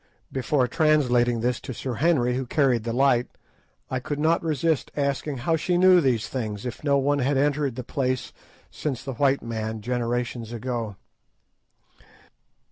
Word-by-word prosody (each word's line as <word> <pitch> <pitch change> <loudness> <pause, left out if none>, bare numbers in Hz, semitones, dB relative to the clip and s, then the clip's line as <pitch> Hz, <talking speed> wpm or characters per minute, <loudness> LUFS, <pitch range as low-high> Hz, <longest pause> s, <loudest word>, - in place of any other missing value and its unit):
Before 130 0 +1
translating 125 -5 +2
this 125 0 0
to 130 - -7
Sir 130 +2 -4
Henry, 125 -3 +2
who 130 0 -3
carried 125 -5 +2
the 115 - -1
light, 125 -1 +3 0.6
I 130 - 0
could 145 +3 -4
not 160 +3 +2
resist 160 -1 0
asking 140 0 -1
how 165 +7 +1
she 175 +3 0
knew 185 0 +6
these 125 -6 +1
things, 110 -4 -4
if 125 +3 -6
no 140 -2 +3
one 140 +1 +1
had 140 +1 +1
entered 145 -2 +1
the 125 - -5
place 130 -1 -2 0.4
since 135 -4 -4
the 135 -1 -4
white 140 +2 +2
man, 110 -1 -4
generations 120 0 -2
ago. 115 -3 -3
130 Hz, 155 wpm, -25 LUFS, 120-145 Hz, 0.6 s, knew